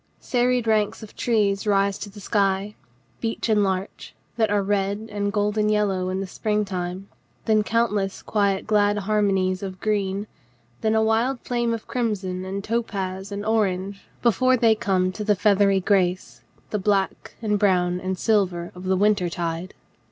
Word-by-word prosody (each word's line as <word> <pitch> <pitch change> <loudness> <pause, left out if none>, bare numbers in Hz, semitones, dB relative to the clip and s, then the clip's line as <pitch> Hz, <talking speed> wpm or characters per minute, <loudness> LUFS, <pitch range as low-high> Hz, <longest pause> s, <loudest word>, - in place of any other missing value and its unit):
Serried 245 -1 +1
ranks 215 0 +1
of 215 - -12
trees 210 -4 +1
rise 200 -1 +2
to 205 - -6
the 205 +1 -12
sky, 200 0 0 0.5
beech 225 0 -2
and 210 -2 +4
larch, 190 0 -3 0.2
that 225 -2 +2
are 205 -1 +1
red 200 +2 -1
and 205 -1 -1
golden 210 +1 +1
yellow 195 -3 +1
in 185 +1 -2
the 195 - -2
spring 210 +2 -1
time, 185 0 -4 0.4
then 215 -1 +3
countless 210 -3 0
quiet 200 -2 0
glad 205 -1 +2
harmonies 195 -3 +1
of 190 -2 -6
green, 200 -1 -1 0.6
then 220 0 +1
a 220 - +3
wide 230 +4 +1
flame 240 -1 -1
of 230 -1 -3
crimson 195 -7 -2
and 195 +1 -4
topaz 200 -4 -3
and 205 +1 -4
orange 200 -3 0 0.2
before 255 +3 +3
they 230 -2 +5
come 185 -3 0
to 210 +3 -5
the 210 0 +3
feathery 200 -1 +3
grace, 180 - 0 0.3
the 210 - 0
black 195 -1 -1
and 210 -2 0
brown 180 -3 +2
and 185 0 -3
silver 185 -5 +1
of 180 +1 -10
the 190 0 +2
wintertide. 180 -3 0
205 Hz, 160 wpm, -24 LUFS, 190-215 Hz, 0.6 s, they